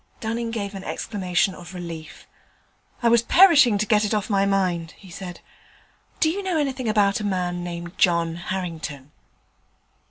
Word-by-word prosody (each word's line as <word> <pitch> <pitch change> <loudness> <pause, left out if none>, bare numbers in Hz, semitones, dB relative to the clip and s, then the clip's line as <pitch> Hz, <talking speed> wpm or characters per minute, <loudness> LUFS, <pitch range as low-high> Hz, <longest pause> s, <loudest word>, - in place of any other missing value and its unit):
Dunning 230 +1 -3
gave 205 -3 -4
an 195 -1 -7
exclamation 190 -3 -1
of 180 +1 -11
relief. 170 -3 -8 0.8
'I 235 - +5
was 235 0 +5
perishing 290 - +6
to 210 - 0
get 215 -1 +3
it 210 +1 0
off 210 +1 -2
my 195 0 +3
mind,' 180 -4 0
he 190 -3 -15
said. 180 0 -8 0.8
'Do 315 - +3
you 400 +4 -3
know 375 -4 -1
anything 265 -5 -1
about 205 -1 +2
a - - -5
man 180 -3 -2
named 175 0 -7
John 170 -2 +2
Harrington?' 165 -6 -5
195 Hz, 160 wpm, -23 LUFS, 175-225 Hz, 0.8 s, perishing